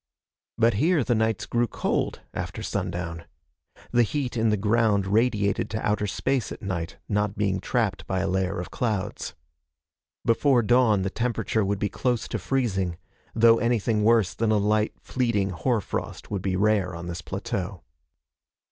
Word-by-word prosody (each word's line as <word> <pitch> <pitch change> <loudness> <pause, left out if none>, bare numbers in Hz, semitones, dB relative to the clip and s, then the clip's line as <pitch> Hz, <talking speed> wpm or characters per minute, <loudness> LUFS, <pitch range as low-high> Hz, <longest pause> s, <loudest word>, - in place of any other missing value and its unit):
But 115 0 +4
here 165 -2 +3
the 120 - +1
nights 110 0 0
grew 120 0 +1
cold, - - -1
after - - -5
sundown. 85 -3 -3 0.7
The 120 - +4
heat 125 +2 -1
in 115 -1 +2
the 105 - +2
ground 105 -1 +2
radiated 105 -1 +1
to 110 - -2
outer 105 0 +1
space 130 +3 -1
at - - -8
night, 90 -3 -3
not 105 -1 0
being 100 -3 +1
trapped 100 -1 -1
by 95 -1 0
a 95 - 0
layer 95 0 0
of 90 - -6
clouds. 105 - -2 0.9
Before 120 +1 +3
dawn, 115 -4 +4
the 95 - -2
temperature 115 -2 0
would 100 +1 0
be 100 - 0
close 120 +4 -1
to 110 - -2
freezing, 95 -6 -1 0.4
though 115 0 +6
anything 115 -2 +1
worse 110 -3 +4
than 115 -1 0
a 110 - +4
light 105 +1 +1
fleeting 110 -6 0
hoar 110 +7 0
frost - - -5
would 100 -2 -1
be 95 -1 -1
rare 100 -2 +2
on 85 +1 -7
this 85 0 -5
plateau. 95 -2 -4
105 Hz, 165 wpm, -26 LUFS, 95-115 Hz, 0.9 s, though